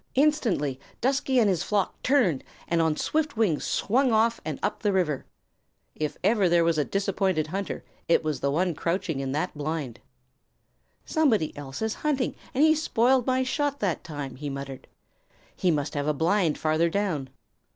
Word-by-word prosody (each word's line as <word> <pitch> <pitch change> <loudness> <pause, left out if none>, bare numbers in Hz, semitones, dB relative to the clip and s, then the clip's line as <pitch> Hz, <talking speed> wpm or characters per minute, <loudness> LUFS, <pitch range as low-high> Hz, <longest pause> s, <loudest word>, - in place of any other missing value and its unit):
Instantly 235 - +2 0.2
Dusky 265 +1 +1
and 230 -4 +5
his 185 -5 +1
flock 205 -3 -1
turned 240 - +2 0.2
and 170 -1 +2
on 160 -2 +1
swift 305 -5 -1
wings 195 -10 +1
swung 255 +4 +2
off 225 +1 +2
and 155 -3 -4
up 210 - -1
the 210 - +2
river. 170 -8 0 0.7
If 150 -1 -3
ever 200 -2 +3
there 170 0 +4
was 165 -2 +2
a - - +3
disappointed 195 -3 0
hunter, 195 +5 -4 0.2
it 170 - +3
was 155 -2 -2
the 140 - 0
one 175 +5 +1
crouching 170 -1 -2
in 135 -1 -2
that 155 +4 -2
blind. 145 -5 -4 1.1
"Somebody 240 - +1
else 140 +6 -6
is 220 -1 0
hunting, 285 -4 0 0.2
and 275 - +2
he 315 0 +6
spoiled 260 -4 +2
my 260 0 +2
shot 285 +2 -1
that 190 -5 -1
time," 145 -5 -6
he 145 +1 -4
muttered. 140 -1 -7 0.7
"He 185 - +1
must 145 -3 0
have 145 0 -2
a 150 - +1
blind 170 +1 +2
farther 160 +2 +2
down. 165 -8 -1
180 Hz, 170 wpm, -26 LUFS, 150-230 Hz, 1.1 s, he